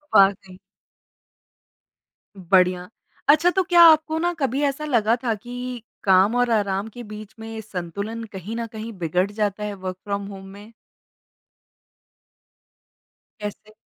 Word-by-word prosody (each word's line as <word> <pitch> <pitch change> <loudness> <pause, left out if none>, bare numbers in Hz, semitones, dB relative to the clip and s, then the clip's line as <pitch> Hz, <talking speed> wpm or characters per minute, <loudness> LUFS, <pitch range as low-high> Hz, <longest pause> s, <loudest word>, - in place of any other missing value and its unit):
वाक़ई। 195 -1 +4 1.8
बढ़िया। 180 0 +2 0.4
अच्छा 310 +4 +6
तो 380 +1 +1
क्या 350 -1 +5
आपको 315 0 +5
ना 350 +1 0
कभी 270 0 0
ऐसा 285 +1 -1
लगा 230 -6 +2
था 235 -3 +1
कि 245 +2 -7 0.2
काम 195 +3 +4
और 245 -1 +2
आराम 200 -1 0
के 245 - -8
बीच 210 -1 -10
में 225 0 -7
संतुलन 200 +3 -5
कहीं 195 +4 -6
न 230 0 -3
कहीं 220 +1 -7
बिगड़ 180 +3 0
जाता 210 -1 -2
है 210 0 -3
वर्क 185 -2 -6
फ्रॉम 200 -1 -3
होम 195 -1 -9
में? 205 +3 -13 2.7
कैसे? 210 +1 -7
215 Hz, 130 wpm, -23 LUFS, 195-245 Hz, 2.7 s, अच्छा